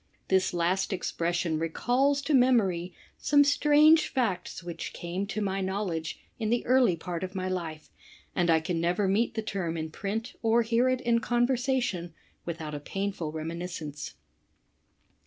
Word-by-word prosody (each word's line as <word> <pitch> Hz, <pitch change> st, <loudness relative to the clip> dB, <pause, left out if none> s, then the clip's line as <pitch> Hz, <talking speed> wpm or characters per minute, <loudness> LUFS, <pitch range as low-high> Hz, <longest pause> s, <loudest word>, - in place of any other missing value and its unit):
This 190 Hz, -1 st, +3 dB
last 175 Hz, +3 st, 0 dB
expression 170 Hz, -3 st, -1 dB
recalls 255 Hz, -, +1 dB
to 305 Hz, -, 0 dB
memory 210 Hz, -9 st, +3 dB, 0.3 s
some 285 Hz, 0 st, +5 dB
strange 300 Hz, +2 st, +5 dB
facl^ 190 Hz, -8 st, -1 dB
which 170 Hz, -1 st, -6 dB
came 180 Hz, +3 st, -4 dB
to 215 Hz, +1 st, -3 dB
my 195 Hz, 0 st, -1 dB
knowledge 190 Hz, -4 st, -3 dB, 0.2 s
in 220 Hz, -2 st, -1 dB
the 240 Hz, +1 st, +1 dB
early 250 Hz, -7 st, +4 dB
part 170 Hz, +1 st, -5 dB
of 185 Hz, +1 st, -5 dB
my 185 Hz, 0 st, -2 dB
life, 165 Hz, -4 st, -5 dB, 0.4 s
and 175 Hz, -2 st, +1 dB
I 160 Hz, -1 st, +4 dB
can 165 Hz, +1 st, -2 dB
never 180 Hz, +4 st, +1 dB
meet 215 Hz, +4 st, +1 dB
the 220 Hz, -, -2 dB
tertn 180 Hz, -6 st, -3 dB
in 160 Hz, 0 st, -4 dB
print 220 Hz, +7 st, -4 dB
or 230 Hz, +1 st, +3 dB
hear 235 Hz, +3 st, +2 dB
it 255 Hz, 0 st, 0 dB
in 235 Hz, -2 st, +2 dB
conversation 240 Hz, -7 st, 0 dB, 0.3 s
without 160 Hz, -3 st, -5 dB
a 145 Hz, -, -4 dB
painful 195 Hz, 0 st, -3 dB
reminiscence. 160 Hz, -1 st, -5 dB
190 Hz, 155 wpm, -28 LUFS, 170-240 Hz, 0.4 s, some